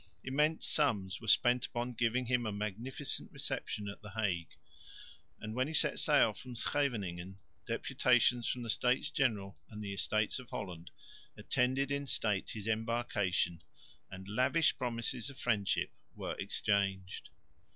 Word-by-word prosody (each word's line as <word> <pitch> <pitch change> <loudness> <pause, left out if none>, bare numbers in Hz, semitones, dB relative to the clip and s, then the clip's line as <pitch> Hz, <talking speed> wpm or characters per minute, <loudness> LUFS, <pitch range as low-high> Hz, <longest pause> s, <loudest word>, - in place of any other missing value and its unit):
Immense 150 +4 +1
sums 105 -10 +1
were 110 - -9
spent 120 +4 +4
upon 120 +1 -3
giving 120 +2 +1
him 120 -1 +1
a - - -1
magnificent 110 +7 -4
reception 105 -1 -3
at 100 - -7
the 105 - -9
Hague; 95 -6 -1 0.9
and, 110 0 -5
when 130 +3 +1
he 160 - -2
set - - +3
sail 145 -7 +5
from 125 +3 -9
Scheveningen, 100 -10 -1 0.3
deputations 120 -1 +3
from 125 - -1
the 115 - -6
States 125 +6 +2
General 105 - 0
and 105 0 -7
the 100 -1 -4
Estates 110 +3 0
of 125 - -11
Holland 90 -3 -6 0.5
attended 130 +2 +1
in 140 0 -1
state 105 -6 +1
his 110 -1 -5
embarkation 110 -6 0 0.5
and 95 0 -9
lavish 130 +10 +3
promises 120 0 -1
of 140 - -11
friendship 105 -5 +1 0.2
were - - -4
exchanged. 95 -2 -1
115 Hz, 140 wpm, -34 LUFS, 100-125 Hz, 0.9 s, sail